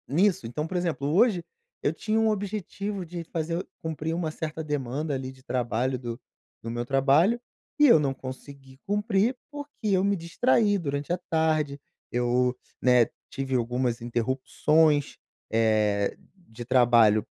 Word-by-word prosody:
Nisso. 185 +6 +2
Então, 150 +7 -3
exemplo, 170 -6 -1
hoje, 195 -2 +4 0.4
eu 145 - +1
tinha 215 +6 -1
um 225 0 +3
objetivo 200 -1 -3
de 170 0 -6
fazer 165 +2 -3 0.2
cumprir 160 0 -3
uma 165 -2 -2
certa 160 0 -5
demanda, 145 0 -2
ali, 130 -1 -4
de 130 0 -18
trabalho, 125 0 -1
do 120 -1 -6 0.4
do 115 - -5
meu 120 +1 -3
trabalho, 145 - +3 0.4
e 295 - +7
eu 235 - +7
não 140 -2 0
consegui 135 +1 -10
cumprir, 205 +3 +1 0.2
porque 290 0 -7 0.3
eu 185 - +2
me 200 0 +2
distraí 205 +5 +2
durante 145 -3 -3
a 175 - +2
tarde. 155 -4 0 0.3
Eu, 125 +1 +1 0.2
né, 125 -2 +5 0.2
tive 135 -1 -2
algumas 120 0 0
interrupções, 135 +5 +1 0.3
eh, 110 -2 +2 0.2
de 120 -10 -11
trabalho, 120 -4 +4
145 Hz, 140 wpm, -27 LUFS, 125-180 Hz, 0.4 s, e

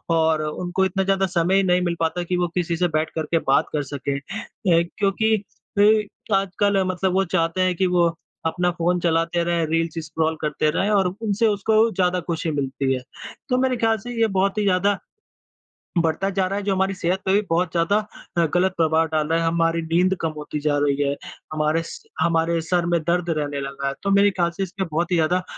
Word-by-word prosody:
और 160 -1 +2
उनको 180 +5 -1
इतना 190 +1 0
ज़्यादा 195 0 +2
समय 185 +2 +2
नहीं 180 -1 +2
मिल 170 -1 -1
पाता 165 +2 0
कि 180 +1 -1
वो 175 0 +1
किसी 170 -1 0
से 180 +1 +2
बैठ 155 0 -1
कर 160 - -1
के 165 - +3
बात 135 - +3
कर 145 -1 0
सकें 140 0 -4
अ, - - -5 0.8
क्योंकि 220 +2 +2 0.4
अ, 210 0 +2
आजकल 195 0 +1
मतलब 185 0 0
वो 195 +1 +3
चाहते 165 +1 +1
हैं 185 -1 +2
कि 185 +2 +1
वो 170 -1 +5 0.4
अपना 175 +2 +1
फ़ोन 175 +1 0
चलाते 165 0 +1
रहें, 170 -1 0
रील्स 165 0 -1
स्क्रॉल 160 0 -1
करते 150 0 0
रहे 195 +5 0
और 195 -3 +3
उनसे 220 +1 +1
उसको 220 +2 +2
ज़्यादा 180 0 +1
खुशी 165 -1 -2
मिलती 135 -2 -1
है। 130 - -3 0.5
तो 250 - +2
मेरे 255 -1 +1
ख़्याल 225 -1 +2
से 245 +4 -7
ये 225 - +5
बहुत 195 0 0
ही 210 - +1
ज़्यादा, 200 +1 +2 1.0
बढ़ता 165 +4 +1
जा 190 -1 0
रहा 195 +1 -2
है - - -6
जो 195 -1 +1
हमारी 190 +1 +1
सेहत 185 +1 -1
पे 190 - +2
भी 205 - +4
बहुत 165 0 +1
ज़्यादा 170 +4 +2 0.4
अ, 170 - +4
गलत 185 +1 +2
प्रभाव 160 0 +2
डाल 155 -1 -1
रहा 165 +1 +1
है, 165 - 0
हमारी 165 0 +1
नींद 175 +4 +2
कम 165 -1 -1
होती 150 0 -5
जा 145 -1 +1
रही 140 0 +1
है, 140 0 +1 0.4
हमारे 155 +1 +1
स - - -9 0.2
हमारे 165 0 +2
सर 175 +1 0
में 170 -1 +2
दर्द 175 +2 0
रहने 145 -3 -2
लगा 140 0 -4
है, 140 - -1
तो 200 - 0
मेरे 200 +1 +5
ख़्याल 175 -2 0
से 195 - 0
इसके 190 +1 -4
बहुत 170 +3 -2
ही - - +3
ज़्यादा 180 +3 +1
175 Hz, 215 wpm, -22 LUFS, 160-195 Hz, 1.0 s, वो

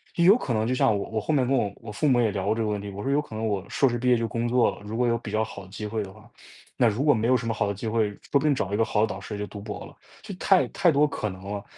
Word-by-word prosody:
有 185 +7 +6
可 130 - -3
能 110 +1 0
就 130 - +1
像 110 - +3
我 100 - -5
我 110 - 0
后 155 - -2
面 130 -4 +2
跟 135 0 +2 0.2
我 110 -2 -8
父 150 +8 0
母 125 -3 +4
也 110 - +2
聊 95 -1 -3
过 105 - +2
这 115 - -2
个 110 - 0
问 105 -1 -1
题。 100 - -6
我 100 +1 -7
说 135 - -1
有 145 +1 +3
可 115 -7 -10
能 110 +1 -2
我 100 -3 -1
硕 135 - +2
士 120 - -1
毕 125 +2 -2
业 120 - +5
就 115 0 -1
工 115 +1 -2
作 125 0 +3
了， - - -15
如 105 +2 -6
果 125 0 +2
有 115 0 +2
比 - - -8
较 110 +1 +1
好 100 -3 -8
的 95 - -17
机 105 +1 -6
会 110 0 -2
的 95 - -9
话， - - -17 0.5
那 120 - +4
如 110 +6 0
果 145 - +6
没 115 0 0
有 130 0 +4
什 115 -1 -5
么 115 - 0
好 105 -1 0
的 100 - -1
机 105 +4 -6
会， 110 -1 +1
说 100 - -11 0.2
不 140 - +6
定 150 0 +2
找 100 -5 -2
一 - - +1
个 115 - +3
好 105 -1 0
的 110 - +3
导 95 -1 -6
师 105 0 -6
就 105 - -3
读 100 - -9
博 105 0 -7
了， - - -14 0.3
就 210 -2 -8
太 190 +1 +3
太 175 -3 +3
多 150 +1 +4
可 110 -7 -3
能 95 0 -10
了。 100 0 -5
110 Hz, 390 characters per minute, -26 LUFS, 105-125 Hz, 0.5 s, 有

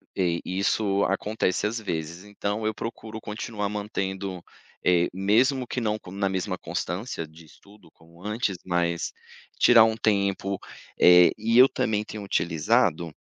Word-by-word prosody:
Sei, 85 -3 0
isso 100 +1 0
acontece 100 -1 -1
às 115 +2 -1
vezes 85 -3 -5
então 105 +1 -3
eu 110 - -1
procuro 110 0 -7
continuar 105 -1 -4
mantendo, 95 -3 -4 0.4
eh, 90 -1 +4
mesmo 120 +8 +2
que 125 - -4
não 110 -2 0
na 100 0 -1
mesma 95 0 -2
constância 90 +1 -4
de 80 +1 -16
estudo 100 +4 -19
como 85 +2 -20
antes 105 -2 -2
mas, 85 -1 -1 0.5
tirar 115 -2 +7
um 110 0 0
tempo, 100 -2 0 0.4
eh, 90 0 +7
e 115 +2 +1
eu 130 +1 +9
também 105 -5 -1
tenho 105 -1 -7
utilizado, 85 -1 +1
100 Hz, 140 wpm, -25 LUFS, 90-110 Hz, 0.5 s, eu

